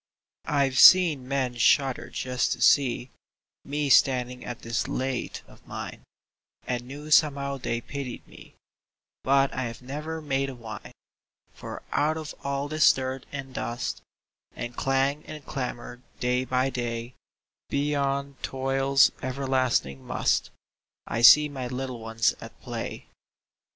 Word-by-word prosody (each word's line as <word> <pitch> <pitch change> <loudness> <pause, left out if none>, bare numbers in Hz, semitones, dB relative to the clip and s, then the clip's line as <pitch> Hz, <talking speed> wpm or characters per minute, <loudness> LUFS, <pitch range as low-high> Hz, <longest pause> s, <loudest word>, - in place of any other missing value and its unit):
I've 140 -3 +1
seen 165 -9 +7
men 130 -3 -1
shudder 135 +2 +2
just 125 -1 -1
to - - -9
see 125 -3 +3 0.5
Me 145 +1 -2
standing 125 -2 +3
at 120 - -7
this 115 0 -2
lathe 130 -1 -3
of - - -20
mine, - - -7 0.6
And 120 -1 -3
knew 145 +3 -9
somehow 140 -2 +3
they 120 -2 -3
pitied 135 -2 -7
me, - - -15 0.7
But 135 0 +3
I 130 - -2
have 115 +1 -7
never 150 +5 -5
made 135 -3 -1
a 135 - -7
whine; 115 -3 -9 0.6
For - - -8
out 155 +2 +1
of 155 -2 -6
all 140 0 -2
this 155 0 +5
dirt 130 0 -4
and 135 -2 -7
dust 120 -1 -4 0.5
And 120 0 -6
clang 135 +2 0
and 150 -3 -9
clamor 125 -2 -5 0.2
day 125 +1 0
by 130 +1 0
day, 120 -1 -4 0.6
Beyond 140 -1 -1
toil's 135 0 +2
everlasting 130 - 0
"must," - - 0 0.6
I 115 - -2
see 150 +5 +9
my 135 -3 -5
little 130 -1 -5
ones 115 0 +1
at - - -11
play. - - -6
135 Hz, 135 wpm, -26 LUFS, 125-140 Hz, 0.7 s, see